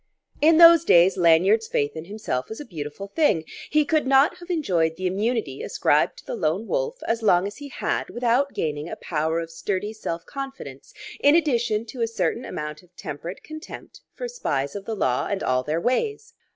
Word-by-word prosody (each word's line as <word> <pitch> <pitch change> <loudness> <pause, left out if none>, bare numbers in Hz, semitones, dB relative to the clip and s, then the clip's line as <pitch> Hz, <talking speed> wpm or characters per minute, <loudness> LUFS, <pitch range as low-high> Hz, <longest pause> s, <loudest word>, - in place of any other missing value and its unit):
In 315 +2 +6
those 335 -1 +9
days 175 - +5
Lanyard's 185 +6 +4
faith 145 +2 -1
in 160 0 -6
himself 190 -10 -4
was 220 - -7
a 295 - -7
beautiful 165 +1 -7
thing. 205 - +2 0.3
He 300 0 +3
could 305 -2 +1
not 270 +2 +4
have 350 0 -13
enjoyed 175 - +1
the 185 - -5
immunity 200 - -1
ascribed - - +1
to - - -14
the - - -5
Lone 165 +8 -1
Wolf - - -2
as 230 0 0
long 185 -4 +4
as 205 - -6
he 285 - -8
had - - -2
without 245 +4 +1
gaining 150 0 -2
a - - -5
power 160 0 -1
of 165 0 -6
sturdy 190 +5 -3
self 170 -6 -5
confidence 270 - -8 0.3
in 290 +2 +5
addition 235 -9 +1
to 235 +2 -8
a 230 - +2
certain 230 +2 -2
amount 150 0 -6
of 180 -1 -26
temperate 165 +5 -7
contempt 310 +2 -10
for - - -4
spies 140 - -2
of 200 -1 -6
the 225 - -3
law 130 -10 0
and 200 -1 -2
all 130 0 +1
their 155 +5 -2
ways. 430 - -1
210 Hz, 195 wpm, -24 LUFS, 165-275 Hz, 0.3 s, those